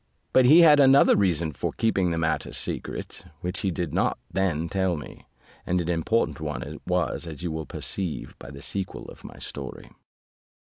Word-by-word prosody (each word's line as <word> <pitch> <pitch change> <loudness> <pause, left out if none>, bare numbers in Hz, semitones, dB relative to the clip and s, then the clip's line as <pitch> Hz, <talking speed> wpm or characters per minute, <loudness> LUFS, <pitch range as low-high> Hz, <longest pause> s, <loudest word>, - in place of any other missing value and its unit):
But 130 - +6
he 155 +7 +8
had 150 -3 +7
another 135 0 +6
reason 85 -5 +1
for - - -3
keeping 100 -5 +1
the 85 - -1
matter 80 -1 -1
secret, - - -3 0.2
which 90 +2 -3
he 95 - 0
did 85 -3 -3
not - - +1
then 85 -4 0
tell 95 0 0
me, 75 -3 -10 0.4
and 90 0 0
an 85 0 -2
important 85 +7 0
one 75 -5 -4
it - - -9
was, 85 - -1
as 80 -1 -8
you 85 - -2
will 80 0 -5
perceive 95 -5 -3
by 65 - -10
the 70 0 -9
sequel 95 -2 -4
of - - -14
my - - -10
story. 65 -3 -7
85 Hz, 185 wpm, -26 LUFS, 80-100 Hz, 0.4 s, he